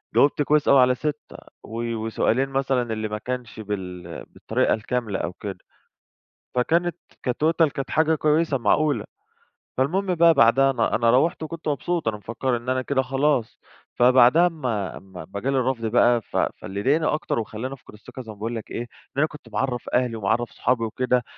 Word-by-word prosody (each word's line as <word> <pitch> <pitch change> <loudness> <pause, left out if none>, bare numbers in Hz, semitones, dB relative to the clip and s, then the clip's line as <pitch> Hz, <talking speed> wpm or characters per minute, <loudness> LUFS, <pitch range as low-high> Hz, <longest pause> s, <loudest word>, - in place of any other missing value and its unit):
جاوبت 145 +1 +4
كويس 150 +1 +2
أوي 140 - +6
على 125 0 +4
6 150 +2 -5 0.3
و 115 +1 -4
وسؤالين 115 +4 0
مثلًا 135 -4 0
اللي 110 0 -3
ما 105 0 -4
كانش 125 0 -6
بال 90 -5 -6
بالطريقة - - 0
الكاملة 110 -2 -2
أو 85 - -3
كده، 100 0 -7 1.0
فكانت 165 +7 +1 0.3
كtotal 160 +6 +2
كانت 135 -1 -5
حاجة 160 0 +3
كويسة 155 -1 +1
معقولة، 125 +2 +1 0.7
فالمهم 180 +8 +1
بقى 170 0 +6
بعدها 135 +2 +5
أنا 120 -3 0
أنا 115 0 +3
رّوحت 160 +6 +2
وكنت 165 0 -7
مبسوط، 160 +1 -1
أنا 110 -1 0
مفكر 120 +4 -2
إن 120 +2 -7
أنا 130 0 +1
كده 130 0 0
خلاص، 135 -2 0 0.4
فبعدها 125 +7 +6
اما 125 - -3
اما 95 -3 -10
اما 95 +5 -7
جالي 135 +4 0
الرفض 125 -2 0
بقى، 120 +1 +3
ف - - -6
فاللي 95 +3 -2
ضايقني 150 +6 +2
أكتر 150 -6 -1
وخلاني 115 +4 -5
افقد 130 -5 -14
الثقة 105 +4 -10
زي 115 - -12
ما - - -11
باقول 115 +3 -4
لك 110 - -7
إيه؟ - - -3
إن 120 - -6 0.3
أنا 150 - +4
كنت 150 -1 -13
معرَّف 125 -3 -2
أهلي 125 -2 +1
ومعرَّف 110 +3 0
صحابي 125 -2 0
وكده، 125 +2 0
125 Hz, 175 wpm, -24 LUFS, 115-145 Hz, 1.0 s, أوي